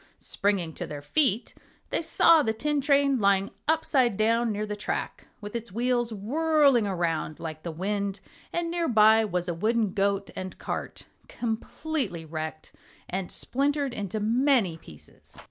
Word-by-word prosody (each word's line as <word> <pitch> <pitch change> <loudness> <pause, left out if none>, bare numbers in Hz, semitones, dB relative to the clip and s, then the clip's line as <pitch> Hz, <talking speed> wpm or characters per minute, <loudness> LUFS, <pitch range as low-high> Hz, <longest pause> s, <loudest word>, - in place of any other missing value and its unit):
Springing 195 -5 -1
to - - -5
their 145 -1 -7
feet 240 - +1 0.4
they - - +1
saw 330 0 +5
the 220 -6 0
tin 290 +6 -1
train 280 -1 +3
lying 200 -1 +2 0.2
upside 275 -8 +2
down 230 +1 +2
near 210 0 -2
the 210 0 -4
track, 205 - -4
with 205 +2 -7
its 235 -4 -5
wheels 240 +2 0
whirling 275 +2 +2
around 165 -4 -2
like 155 -1 -6
the 170 - -5
wind, 200 +3 -2 0.3
and 340 -1 -2
near 340 -1 0
by 220 -1 +6
was 180 -4 -2
a 175 - -1
wooden 215 +3 0
goat 200 0 0
and 185 0 -6
cart, - - -5 0.2
completely 230 - -3
wrecked 155 0 -6 0.3
and 185 0 -4
splintered 280 0 0
into 205 -1 -3
many 230 - +2
pieces. 75 - -14
215 Hz, 150 wpm, -27 LUFS, 190-265 Hz, 0.4 s, by